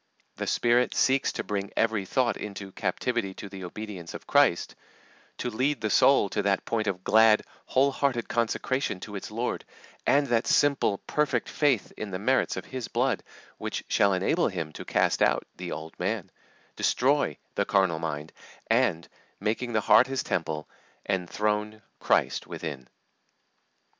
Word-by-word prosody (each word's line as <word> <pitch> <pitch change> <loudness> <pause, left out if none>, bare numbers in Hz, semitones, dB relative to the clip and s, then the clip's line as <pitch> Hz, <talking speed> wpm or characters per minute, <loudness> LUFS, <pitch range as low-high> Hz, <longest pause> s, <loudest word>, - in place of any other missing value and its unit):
The - - -3
Spirit 120 +1 +2
seeks 135 +1 +3
to - - -3
bring 100 -1 -3
every 110 -3 +1
thought 125 +4 +1
into 100 -2 -7
"captivity 100 +1 -2
to - - -7
the 95 -1 -9
obedience 95 -2 -7
of - - -9
Christ," - - +3 0.6
to 125 - -3
lead 130 +4 0
the 110 - -1
soul 135 -2 +5
to 105 - -1
that 100 -1 0
point 110 -2 -1
of 95 -2 -2
glad, 110 +1 +5 0.2
whole 135 +2 +3
hearted 135 -4 0
consecration 120 -1 -1
to 105 - -7
its 100 - -6
Lord, 115 +3 -2 0.4
and 145 +1 +4
that 120 -3 +1
simple, 140 -8 +3
perfect 145 -5 0
faith 135 -9 +1
in 105 - -5
the 90 - -3
merits 130 +7 +1
of - - -5
His 130 -3 -5
blood 125 +1 0 0.4
which - - -4
shall 100 -1 +3
enable 95 - +2
Him 85 -6 -4
to - - -8
cast - - +1
out - - +3
"the 90 -1 -6
old 80 +1 -7
man," 95 0 -2 0.4
destroy 135 - +2 0.2
"the - - 0
carnal 95 -5 +2
mind," 80 -1 -4 0.4
and, 85 +1 +2 0.3
making 115 +4 -2
the 110 - +2
heart 125 - +6
His 135 0 -2
temple, 80 -3 -2 0.4
enthrone 105 +3 -1 0.2
Christ - - +1
within. 70 -6 -6
105 Hz, 160 wpm, -27 LUFS, 95-125 Hz, 0.6 s, heart